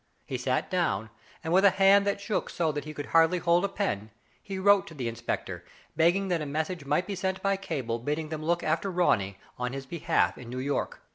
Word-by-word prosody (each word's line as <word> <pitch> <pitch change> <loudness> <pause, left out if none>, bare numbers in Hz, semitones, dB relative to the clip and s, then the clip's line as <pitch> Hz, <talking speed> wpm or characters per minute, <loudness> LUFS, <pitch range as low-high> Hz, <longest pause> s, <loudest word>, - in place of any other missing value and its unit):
He 130 - -5
sat 130 +1 -1
down, 110 - 0 0.3
and, 160 - -1
with 190 +2 +5
a 200 - +8
hand 195 +2 +5
that 200 - 0
shook 205 +1 -2
so 165 -3 0
that 145 -1 -5
he 155 - -6
could 145 - -4
hardly 165 +2 +4
hold 175 +1 +2
the 200 - +1
pen, 110 - -2 0.3
he 195 -2 -6
wrote 200 +1 +4
to 160 - -10
the 125 -4 -3
inspector, 115 +1 -4 0.3
begging 175 +5 +3
that 175 -3 +1
a - - -3
message 160 +2 -3
might 150 +6 +1
be 205 - -4
sent 190 0 -2
by 195 0 +2
cable, 135 -12 -3
bidding 150 +5 -3
them 155 -1 -4
look 170 +2 0
after 165 +5 0
Ronny 105 - +1 0.2
on 125 0 -2
his 135 0 -5
behalf 170 +3 0
in 120 -2 -10
New 125 - -5
York. 140 +2 -2
165 Hz, 225 wpm, -28 LUFS, 135-190 Hz, 0.3 s, a